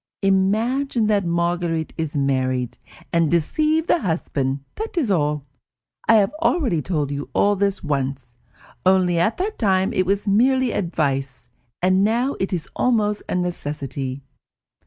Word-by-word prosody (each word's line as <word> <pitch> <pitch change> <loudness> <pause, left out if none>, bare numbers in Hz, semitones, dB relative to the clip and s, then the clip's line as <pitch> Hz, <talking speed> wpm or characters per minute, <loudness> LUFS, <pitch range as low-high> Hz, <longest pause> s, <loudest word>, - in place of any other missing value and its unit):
Imagine 220 +6 +1
that 205 -3 +2
Marguerite 170 -1 -1
is 160 -2 -4
married, 130 -3 0 0.3
and 165 -2 +3
deceive 305 - +1
the 345 - +2
husband; 140 - -2
that 440 -3 -6
is 265 -11 +1
all. 150 -4 +1 0.6
I 225 - +6
have 205 +3 +3
already 255 - +1
told 150 -4 -2
you 145 0 -4
all 205 0 +3
this 200 0 -1
once, 135 -4 -3 0.5
only 185 -2 +3
at 175 +7 +1
that 410 +4 -3
time 190 -3 +2
it 185 -1 +1
was 200 +1 0
merely 255 +5 +3
advice, 140 -8 -2 0.3
and 185 +1 +4
now 240 +6 +1
it 190 - -1
is 175 -4 -2
almost 210 -4 +1
a - - -1
necessity." 140 -6 -3
180 Hz, 140 wpm, -22 LUFS, 150-215 Hz, 0.6 s, I